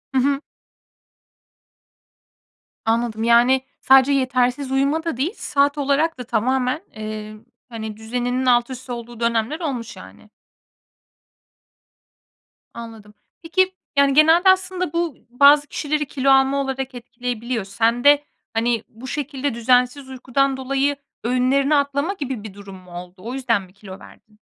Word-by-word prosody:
Hı -, -, +4 dB
hı. 275 Hz, +2 st, +1 dB, 2.4 s
Anladım. 225 Hz, -1 st, 0 dB
Yani, 240 Hz, +3 st, +4 dB, 0.2 s
sadece 265 Hz, +1 st, +5 dB
yetersiz 255 Hz, 0 st, 0 dB
uyuma 280 Hz, +4 st, +1 dB
da 330 Hz, -7 st, -3 dB
değil, 315 Hz, +9 st, -1 dB
saat 285 Hz, +1 st, +1 dB
olarak 285 Hz, +2 st, +1 dB
da 250 Hz, -, -6 dB
tamamen, 255 Hz, -, 0 dB
eee, 215 Hz, 0 st, -6 dB, 0.3 s
hani, 220 Hz, -2 st, -7 dB
düzeninin 245 Hz, +3 st, -2 dB
altüst 250 Hz, +1 st, +1 dB
olduğu 235 Hz, -1 st, -7 dB
dönemler 235 Hz, +6 st, 0 dB
olmuş, 250 Hz, -8 st, -5 dB
yani. -, -, -14 dB, 2.4 s
Anladım. 225 Hz, -3 st, -10 dB, 0.3 s
Peki, 375 Hz, +3 st, +1 dB, 0.2 s
yani, 280 Hz, -1 st, +4 dB
genelde 325 Hz, +6 st, +5 dB
aslında 370 Hz, -3 st, +1 dB
bu 335 Hz, -5 st, -1 dB
bazı 285 Hz, +4 st, +5 dB
kişileri 300 Hz, 0 st, -2 dB
kilo 275 Hz, -1 st, -1 dB
alma 270 Hz, +1 st, +4 dB
olarak 270 Hz, -1 st, -4 dB
etkileyebiliyor. 240 Hz, -1 st, -4 dB
Sende, 240 Hz, +8 st, +3 dB, 0.3 s
hani, 230 Hz, 0 st, 0 dB
bu 235 Hz, +3 st, -12 dB
şekilde 280 Hz, -1 st, -3 dB
düzensiz 250 Hz, +3 st, +1 dB
uykudan 265 Hz, +1 st, 0 dB
dolayı 275 Hz, +2 st, 0 dB, 0.3 s
öğünlerini 255 Hz, +4 st, +2 dB
atlama 285 Hz, +5 st, 0 dB
gibi 265 Hz, -, -5 dB
bir 215 Hz, -, -9 dB
durum 200 Hz, -1 st, -11 dB
mu 185 Hz, -1 st, -15 dB
oldu? 175 Hz, +1 st, -9 dB
O 225 Hz, +7 st, -7 dB
yüzden 245 Hz, -6 st, 0 dB
mi 185 Hz, -1 st, -16 dB
kilo 195 Hz, -1 st, -11 dB
verdin? 210 Hz, 0 st, -18 dB
255 Hz, 125 wpm, -21 LUFS, 230-280 Hz, 2.4 s, sadece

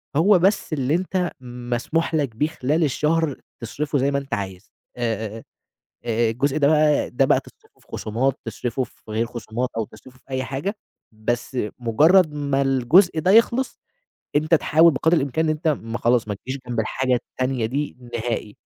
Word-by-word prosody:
هو 180 Hz, +5 st, +5 dB
بس 195 Hz, -3 st, +1 dB
اللي 140 Hz, +2 st, +1 dB
أنت 180 Hz, 0 st, -1 dB
مسموح 125 Hz, +7 st, -2 dB
لك 140 Hz, -8 st, -1 dB
بيه 150 Hz, +6 st, +1 dB
خلال 155 Hz, +1 st, 0 dB
الشهر 150 Hz, 0 st, 0 dB, 0.2 s
تصرفه 145 Hz, +6 st, -2 dB
زي 135 Hz, +1 st, +1 dB
ما 140 Hz, -, +1 dB
أنت 140 Hz, 0 st, -8 dB
عايز، 95 Hz, 0 st, -5 dB, 0.3 s
آآ، 110 Hz, -2 st, -3 dB, 0.6 s
آآ 115 Hz, 0 st, +1 dB
الجزء 135 Hz, +5 st, 0 dB
ده 140 Hz, -2 st, +4 dB
بقى 150 Hz, -1 st, +3 dB
ده 135 Hz, +2 st, +2 dB
بقى -, -, +4 dB
تصرفه -, -, -21 dB
في -, -, -27 dB
خصومات 125 Hz, +5 st, -1 dB
تصرفه 125 Hz, +2 st, -2 dB
في 110 Hz, -, -13 dB
غير 110 Hz, +2 st, 0 dB
خصومات 120 Hz, +1 st, -4 dB
أو 110 Hz, -, 0 dB
تصرفه 130 Hz, +4 st, -16 dB
في -, -, -33 dB
أي 130 Hz, -1 st, -2 dB
حاجة، 140 Hz, +11 st, -3 dB, 0.4 s
بس 120 Hz, +4 st, -3 dB, 0.2 s
مجرد 155 Hz, -, +4 dB
ما 140 Hz, -2 st, 0 dB
الجزء 135 Hz, +7 st, +4 dB
ده 180 Hz, +4 st, +2 dB
يخلص 235 Hz, +4 st, +3 dB, 0.6 s
أنت 155 Hz, +3 st, +4 dB
تحاول 160 Hz, +2 st, +4 dB
بقدر 160 Hz, +5 st, +2 dB
الإمكان 145 Hz, +3 st, 0 dB
إن 155 Hz, -, +2 dB
أنت 155 Hz, +1 st, -3 dB
ما 115 Hz, -6 st, -1 dB
خلاص 120 Hz, -2 st, +2 dB
ما 105 Hz, -, -2 dB
تجيش 130 Hz, +7 st, -6 dB
جنب 120 Hz, -2 st, -2 dB
الحاجة 130 Hz, +3 st, 0 dB
التانية 130 Hz, 0 st, -2 dB
دي 140 Hz, +6 st, -3 dB, 0.2 s
نهائي 115 Hz, -2 st, -3 dB
135 Hz, 175 wpm, -22 LUFS, 120-155 Hz, 0.6 s, هو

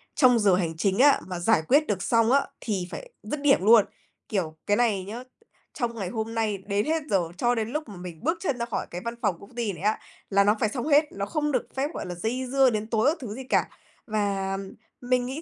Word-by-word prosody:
trong 250 Hz, -4 st, +5 dB
giờ 200 Hz, -4 st, +4 dB
hành 165 Hz, -3 st, -2 dB
chính 190 Hz, +4 st, +1 dB
á 280 Hz, +1 st, +6 dB
mà 180 Hz, -2 st, -4 dB
giải 175 Hz, -1 st, +3 dB
quyết 295 Hz, +4 st, +4 dB
được 195 Hz, -4 st, -1 dB
xong 230 Hz, 0 st, +3 dB
á, 280 Hz, +1 st, +5 dB, 0.2 s
thì 190 Hz, -5 st, -2 dB
phải -, -, -7 dB
dứt 285 Hz, +8 st, -4 dB
điểm 280 Hz, -1 st, +4 dB
luôn. 220 Hz, -2 st, +7 dB, 0.4 s
Kiểu, 165 Hz, -7 st, -2 dB
cái 205 Hz, -, +3 dB
này 220 Hz, -6 st, +2 dB
nhớ, 220 Hz, +6 st, -7 dB, 0.5 s
trong 240 Hz, -3 st, -2 dB
ngày 195 Hz, -5 st, -4 dB
hôm 225 Hz, +2 st, -4 dB
nay, 220 Hz, -3 st, 0 dB
đến 205 Hz, +1 st, 0 dB
hết 320 Hz, 0 st, 0 dB
giờ, 195 Hz, -, +3 dB, 0.2 s
cho 240 Hz, +2 st, +2 dB
đến 225 Hz, 0 st, -2 dB
lúc 305 Hz, -1 st, -4 dB
mà 205 Hz, -, -9 dB
mình 175 Hz, -1 st, -9 dB
bước 325 Hz, +5 st, +1 dB
chân 280 Hz, -9 st, -1 dB
ra 235 Hz, -, -1 dB
khỏi 235 Hz, -, -3 dB
cái 175 Hz, +1 st, -5 dB
văn 235 Hz, -, -2 dB
phòng 185 Hz, -, +1 dB
công 200 Hz, +4 st, -15 dB
ty 230 Hz, -4 st, -1 dB
này 170 Hz, -, -10 dB
á 210 Hz, +2 st, +1 dB, 0.3 s
là 200 Hz, 0 st, +4 dB
nó 210 Hz, +1 st, +4 dB
phải 215 Hz, -, +2 dB
xong 250 Hz, +4 st, -4 dB
hết, 300 Hz, 0 st, +5 dB
nó 200 Hz, 0 st, -3 dB
không 295 Hz, +4 st, -1 dB
được 255 Hz, -, -1 dB
phép, 270 Hz, +2 st, 0 dB
gọi -, -, -5 dB
là, 180 Hz, -1 st, -5 dB
dây 235 Hz, +8 st, -2 dB
dưa 270 Hz, -1 st, +5 dB
đến 215 Hz, -1 st, -2 dB
tối 220 Hz, -1 st, +1 dB
các 325 Hz, -, -1 dB
thứ 215 Hz, -5 st, -6 dB
gì 265 Hz, -, -7 dB
cả. 255 Hz, -, +1 dB, 0.4 s
Và 200 Hz, -3 st, -1 dB, 0.4 s
mình 245 Hz, 0 st, +1 dB
nghĩ 265 Hz, +5 st, -5 dB
225 Hz, 255 wpm, -26 LUFS, 200-255 Hz, 0.5 s, luôn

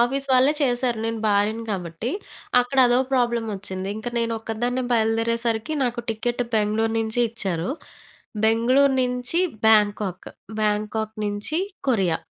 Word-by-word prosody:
Office 270 Hz, +3 st, +1 dB
వాళ్ళే 260 Hz, +3 st, +5 dB
చేసారు. 245 Hz, -2 st, +1 dB
నేను 225 Hz, 0 st, -2 dB
భార్యని 210 Hz, +2 st, +1 dB
కాబట్టి. 180 Hz, +4 st, -3 dB, 0.5 s
అక్కడ 245 Hz, +2 st, -2 dB
అదో 245 Hz, +1 st, +3 dB
ప్రాబ్లమ్ 235 Hz, -3 st, +1 dB
ఒచ్చింది. 190 Hz, -1 st, -5 dB
ఇంక 220 Hz, +2 st, -4 dB
నేను 230 Hz, 0 st, 0 dB
ఒక్కదాన్నే 240 Hz, +3 st, -2 dB
బయలుదేరేసరికి 230 Hz, +3 st, +1 dB
నాకు 240 Hz, 0 st, -1 dB
టికెట్ 240 Hz, +2 st, -1 dB
బెంగుళూరు 220 Hz, +1 st, +1 dB
నుంచి 225 Hz, +2 st, -1 dB
ఇచ్చారు. 190 Hz, -4 st, -2 dB, 0.7 s
బెంగుళూరు 255 Hz, +5 st, +4 dB
నుంచి 250 Hz, +5 st, -1 dB, 0.3 s
బ్యాంకాక్. 205 Hz, -3 st, +2 dB, 0.3 s
బ్యాంకాక్ 215 Hz, +1 st, -1 dB
నుంచి 205 Hz, +10 st, -2 dB, 0.3 s
కొరియా. 190 Hz, -9 st, +2 dB
225 Hz, 120 wpm, -23 LUFS, 210-245 Hz, 0.7 s, వాళ్ళే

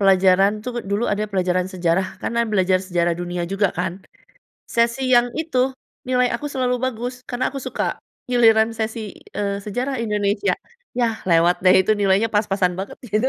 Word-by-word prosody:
pelajaran 195 Hz, 0 st, +5 dB
tuh 250 Hz, -, -4 dB, 0.2 s
dulu 210 Hz, +4 st, +1 dB
ada 210 Hz, +1 st, 0 dB
pelajaran 185 Hz, -1 st, 0 dB
sejarah 180 Hz, +1 st, +1 dB, 0.2 s
karena 235 Hz, 0 st, 0 dB
belajar 185 Hz, -2 st, +3 dB
sejarah 175 Hz, -1 st, +1 dB
dunia 175 Hz, 0 st, -3 dB
juga 195 Hz, -1 st, +2 dB
kan, 180 Hz, -1 st, -1 dB, 0.8 s
sesi 235 Hz, +3 st, +2 dB
yang 240 Hz, 0 st, +4 dB
itu 315 Hz, -5 st, -2 dB, 0.5 s
nilai 250 Hz, -1 st, +3 dB
aku 290 Hz, +5 st, -3 dB
selalu 250 Hz, -1 st, 0 dB
bagus 245 Hz, 0 st, -3 dB
karena 245 Hz, 0 st, -1 dB
aku 275 Hz, -, -4 dB
suka. -, -, -2 dB, 0.3 s
Giliran 225 Hz, -2 st, +4 dB
sesi, 220 Hz, -1 st, -4 dB, 0.2 s
eee, 200 Hz, -1 st, -1 dB
sejarah 250 Hz, +6 st, -2 dB
Indonesia, 210 Hz, -, 0 dB, 0.5 s
yah 230 Hz, -2 st, 0 dB
lewat 170 Hz, +2 st, +3 dB
deh 185 Hz, 0 st, +7 dB
itu 215 Hz, -, +2 dB
nilainya 200 Hz, +2 st, +3 dB
pas-pasan 195 Hz, -3 st, +1 dB
banget 195 Hz, -, -6 dB
gitu. 215 Hz, +4 st, +1 dB
205 Hz, 160 wpm, -21 LUFS, 185-235 Hz, 0.8 s, deh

